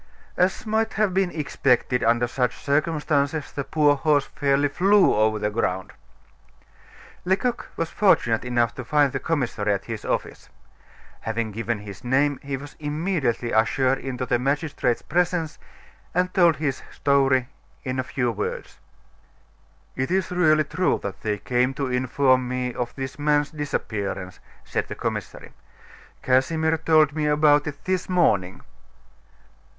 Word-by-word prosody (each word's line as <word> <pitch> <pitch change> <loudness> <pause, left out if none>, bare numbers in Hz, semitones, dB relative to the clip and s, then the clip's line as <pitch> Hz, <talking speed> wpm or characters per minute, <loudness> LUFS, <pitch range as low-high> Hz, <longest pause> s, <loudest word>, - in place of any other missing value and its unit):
As 185 +6 +1
might 220 +1 0
have 210 -3 +1
been 190 -1 +2
expected 135 -5 0
under 120 +1 +3
such 125 0 -1
circumstances, 150 0 0
the 140 - -4
poor 150 0 +3
horse 145 0 +2
fairly 140 0 +1
flew 195 +7 +4
over 110 0 +2
the 105 0 -1
ground. 95 -4 -2 1.3
Lecoq 200 +7 0
was 165 0 -2
fortunate 120 - +2
enough 120 -2 0
to 130 - -7
find 145 +1 +2
the - - -1
commissary 120 -10 -1
at 100 - -4
his 115 -2 -6
office. - - -3 0.7
Having 110 0 -3
given 115 +2 -2
his 105 +3 -10
name, 135 +3 +1
he 140 -1 -4
was 145 +2 -11
immediately 150 -6 -1
ushered 130 +4 +2
into 130 -1 -4
the 120 -1 +1
magistrate's 140 -2 -1
presence 175 -1 -1 0.6
and 180 +1 +1
told 170 -3 +5
his 140 -2 -2
story 135 -2 +2 0.3
in 130 -1 -3
a - - 0
few 125 -2 -1
words. 105 -2 -5 1.2
"It 130 - -2
is 185 0 0
really 155 -4 +3
true 185 +4 0
that 100 -1 -6
they 105 -1 -1
came 125 +5 0
to 135 -2 -2
inform 130 0 +2
me 125 0 -2
of 120 0 -4
this 135 +1 -6
man's 145 0 +1
disappearance," 100 - -4 0.2
said - - -3
the - - -6
commissary. - - -5 0.7
"Casimir 160 +5 +2
told 155 -2 +4
me 155 -1 -1
about 150 0 +4
it 145 -1 -7
this 185 0 -1
morning." 100 - +1
140 Hz, 145 wpm, -24 LUFS, 120-155 Hz, 1.3 s, told